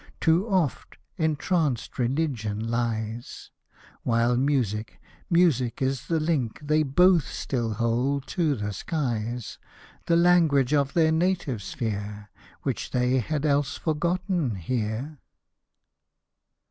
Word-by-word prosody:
Too 175 +7 +2
oft, 180 - -1 0.2
entranced 155 -4 0
Religion 120 -5 -1
lies! 115 -1 -3 0.5
While 120 +1 +2
Music, 120 -5 0 0.3
Music 160 -9 +2
is 130 -2 -1
the 165 -1 +1
link 155 -8 -1
They 155 +1 +2
dof^ 175 +5 +5
still 120 -5 -3
hold 125 +5 0
by - - -11
to 160 -6 +1
the 105 -2 -3
skies, 120 - -3 0.5
The 170 - +4
language 165 -6 +4
of 140 -2 +2
their 160 -2 +4
native 160 - 0
sphere, 105 0 -5 0.3
Which - - -2
they 125 +1 +2
had 150 +5 -2
else 145 -1 +1
forgotten 170 - -1
here. 115 - -3
135 Hz, 110 wpm, -26 LUFS, 115-160 Hz, 0.5 s, dof^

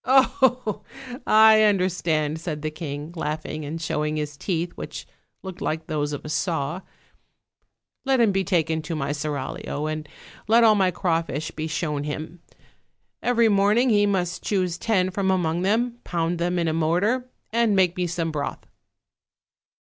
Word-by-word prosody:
"Oh! 260 -4 +3 0.5
I 220 0 +7
understand," 175 -6 +1
said 155 -3 -4
the 155 - -2
king, 150 0 -6
laughing 155 -1 -4
and 155 +3 -5
showing 150 -1 -1
his 150 -1 -3
teeth, 170 +2 -2
which - - -7 0.4
looked 190 -2 -8
like 160 +1 -2
those 150 -2 -2
of 145 - -6
a - - -5
saw; 160 0 -1 1.2
"let 270 -1 +2
him 225 -3 +4
be 195 0 +1
taken 165 -4 +1
to 165 +1 -4
my 140 -2 -2
seraglio, 145 0 -4
and 155 -1 -4 0.4
let 230 +2 +5
all 220 -1 +7
my 195 -3 +3
crawfish 165 -4 -1
be 155 0 -4
shown 150 -2 -2
him. 155 +3 -6 0.8
Every 235 -2 +3
morning 210 +4 +3
he 205 -1 +4
must 185 -3 -1
choose 185 -4 -1
ten 185 -5 +1
from 190 0 -1
among 175 -2 +1
them, 235 +5 0
pound 170 0 -1
them 175 +1 0
in 170 -1 +1
a 160 - +1
mortar, 190 +11 +1 0.2
and 230 -2 +2
make 180 -2 +3
me 180 -2 -1
some 165 -1 -2
broth." 145 -2 -4
175 Hz, 155 wpm, -24 LUFS, 155-205 Hz, 1.2 s, I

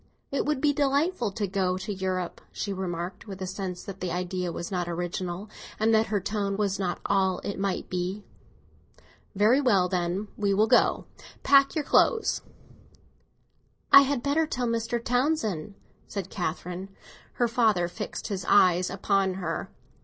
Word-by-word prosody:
"It 280 - -1
would 300 -3 0
be 295 -1 +3
delightful 285 - +1
to 205 +1 -1
go 185 -1 0
to 190 +2 -4
Europe," 185 -2 -3
she 200 - -3
remarked, 180 +1 -5
with 195 -1 -7
a 190 - -3
sense 185 -1 -5
that 195 -1 -8
the 185 - -3
idea 180 0 -2
was 170 +3 -6
not 175 -2 -2
original, 175 +2 -4 0.3
and 220 +1 +3
that 220 0 +4
her 210 -1 0
tone 200 0 -2
was 200 -1 0
not 180 -2 -2
all 190 -2 +2
it 200 - -4
might 195 -1 -2
be. 185 +3 -3 1.1
"Very 220 +8 +4
well, 200 -9 +3
then, 180 +3 -1
we 200 -2 +1
will 215 +2 +4
go. - - +3 0.4
Pack 275 0 +6
up - - -14
your 310 - 0
clothes." 445 - +3 1.5
"I 280 - +11
had 275 -3 0
better 310 +3 +2
tell 250 -4 -2
Mr. 230 +1 -1
Townsend," 235 - -1 0.3
said 200 -4 -5
Catherine. 180 +1 -4 0.4
Her 240 - +1
father 225 -7 +2
fixed 175 - -6
his 190 -3 -3
cold - - +3
eyes 180 -1 +4
upon 195 0 +1
her. 175 -3 -3
195 Hz, 165 wpm, -27 LUFS, 180-230 Hz, 1.5 s, I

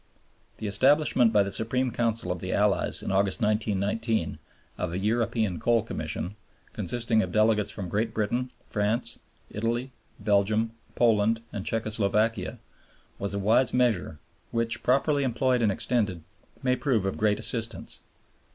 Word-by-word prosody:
The - - -6
establishment 130 +3 +4
by 105 -2 +4
the 100 - -4
Supreme 125 +4 0
Council 115 -6 -1
of 90 - -3
the - - -4
Allies - - +1
in - - -2
August, 95 +2 +2
1919, 110 +1 0 0.4
of 90 -2 -3
a - - -1
European 110 -2 0
Coal 115 -2 +2
Commission, 100 -3 -4 0.4
consisting 115 -2 +2
of - - -3
delegates 110 -1 +2
from 100 -3 -5
Great 110 +5 -1
Britain, 120 +4 -1 0.2
France, 105 +4 -1 0.3
Italy, 120 +4 -2 0.3
Belgium, 105 +2 +2 0.2
Poland, 115 -1 +3
and 100 - -5
Czecho 110 -1 -1
Slovakia 105 +2 +1 0.6
was 100 0 -2
a 100 -1 -3
wise 120 +5 +3
measure 115 -11 +1 0.3
which, 115 -1 -1
properly 140 +3 +2
employed 125 0 +1
and 110 -3 +3
extended, 100 -5 -1 0.4
may 125 -1 +2
prove 125 -8 0
of 95 - -2
great 105 -1 +2
assistance. 115 -2 -2
110 Hz, 140 wpm, -27 LUFS, 105-120 Hz, 0.6 s, establishment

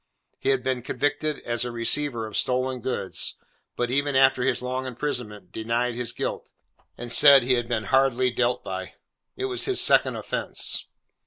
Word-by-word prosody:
He - - -1
had 135 -2 +1
been 130 -1 -1
convicted 145 +4 -2
as 120 0 -1
a 125 - -3
receiver 120 +1 +1
of 110 - -9
stolen 130 0 0
goods, 115 -6 -2 0.4
but 120 0 -2
even 140 +1 0
after 135 -1 +4
his 125 -1 0
long 130 +1 -3
imprisonment, 115 -7 -5
denied 120 +2 -2
his 120 -1 -4
guilt, - - -5 0.5
and 120 -1 -5
said 140 +1 +8
he 130 +1 +2
had 120 -2 -1
been 110 -2 -1
hardly 130 +1 +2
dealt 120 0 0
by. 95 0 -6 0.4
It 390 - -3
was 380 -2 -1
his 390 -2 0
second - - +4
offence. - - -3
125 Hz, 170 wpm, -25 LUFS, 120-135 Hz, 0.5 s, said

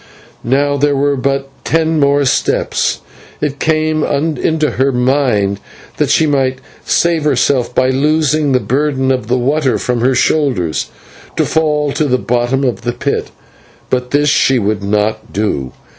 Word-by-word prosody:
Now 140 +3 +1
there 145 +1 +1
were 140 +1 +1
but 135 +1 -1 0.2
ten 160 -1 +1
more 140 0 +3
steps. 130 - 0 0.4
It 145 -1 -3
came 155 -1 +1
into 155 +1 0
her 135 +2 +1
mind 125 -6 +1 0.4
that - - 0
she 160 - +3
might 135 -3 +1 0.3
save 170 -2 +1
herself 135 -3 +1
by 130 0 +3
loosing 150 +1 +1
the 130 - +3
burden 135 0 0
of 125 -4 -2
water 130 0 +1
from 125 -2 -2
her 130 +2 +2
shoulders, 120 - 0 0.5
to - - +2
fall 150 -2 0
to 155 - 0
the 130 -3 +1
bottom 125 +2 0
of 125 -3 -1
the 120 - -2
pit, 140 +3 -2 0.6
but 125 -1 -1
this 145 +2 +2
she 135 -1 +3
would 105 -2 -1
not 105 +2 -1
do. 85 -11 -2
135 Hz, 150 wpm, -14 LUFS, 125-150 Hz, 0.6 s, more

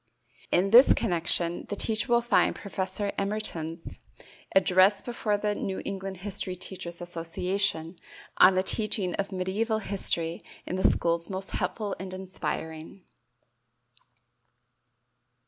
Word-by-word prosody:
In 195 +2 +2
this 245 +4 +8
connection 170 -3 +4
the 205 - -2
teacher 220 +4 -1
will 235 0 +4
find 240 - +2
Professor 190 +2 -3
Emerton's 180 -5 -4 0.6
address 190 +1 +4
before 220 -4 -1
the 210 0 -1
New 190 -2 -4
England 195 -1 -5
History 195 -2 -3
Teachers' 175 -1 -8
Association 175 0 -2 0.4
on 185 0 +7
the 185 - +2
Teaching 205 -3 -1
of 200 - -1
Mediæval 200 +4 -2
History 170 -4 -1 0.2
in - - -4
the 190 - -2
Schools 170 0 +2
most 190 0 -5
helpful 210 -3 -3
and 185 0 -6
inspiring. 175 -2 -6
190 Hz, 115 wpm, -27 LUFS, 175-205 Hz, 0.6 s, this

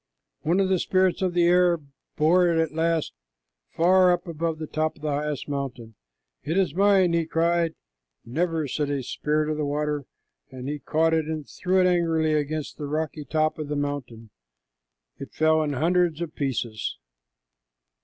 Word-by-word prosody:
One 170 +5 +1
of 195 - +3
the 190 -1 +2
spirits 185 0 +1
of 185 -2 0
the 175 - +4
air 175 0 +4 0.4
bore 175 +4 +4
it 170 -1 +2
at 160 -1 +1
last 165 0 0 0.6
far 180 +2 +4
up 175 +1 0
above 165 0 -2
the 155 - -5
top 155 +1 -2
of 150 - -19
the 150 - -1
highest 145 -1 -2
mountain. 135 -5 -5 0.5
"It 160 +5 -1
is 185 -7 +2
mine," 190 -2 +4
he 165 -1 +1
cried. 165 0 +1 0.5
"Never," 160 +4 -1
said 145 +1 -2
a 140 -2 -2
spirit 150 +4 -1
of 155 0 -2
the 155 - -1
water, 150 -1 -2 0.4
and 130 0 -8
he 145 +1 -3
caught 160 +2 +1
it 160 -1 +1
and 155 -2 -4
threw 185 +1 0
it 185 - +4
angrily 165 -3 +2
against 150 +1 -2
the 145 - -4
rocky 150 0 -3
top 155 +1 0
of 155 - -4
the 150 - -3
mountain. 140 -6 -4 0.9
It 135 - -9
fell 160 0 +3
in 150 -2 -1
hundreds 170 +2 +1
of 170 -2 -4
pieces. 120 -6 -3
155 Hz, 175 wpm, -25 LUFS, 145-170 Hz, 0.9 s, the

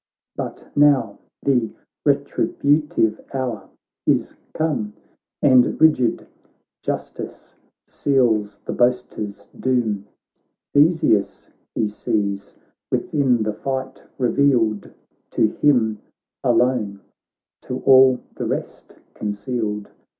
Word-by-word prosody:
But - - -6
now 140 -8 +3 0.2
the 125 -5 +2 0.4
retributive 145 -7 +1
hour 120 -7 -3 0.4
is - - +2 0.2
come, 145 -10 -1 0.5
And 130 -3 +5
rigid 150 -7 +3 0.6
justice - - -5 0.3
seals 110 -7 +1
the - - -3
boaster's 120 -4 -1
doom: 110 -6 0 0.7
Theseus 145 - +2 0.2
he 110 - +1
sees 100 -1 -2 0.4
within 130 -6 +1
the 110 0 -1
fight, 130 +3 -4
revealed 120 -5 +2 0.4
To 110 - +3
him 115 -7 +3 0.4
alone— 120 -4 +1 0.6
to - - -5
all 130 -1 +7
the - - -4
rest - - -5 0.2
concealed. 105 0 -3
120 Hz, 85 wpm, -21 LUFS, 105-135 Hz, 0.7 s, all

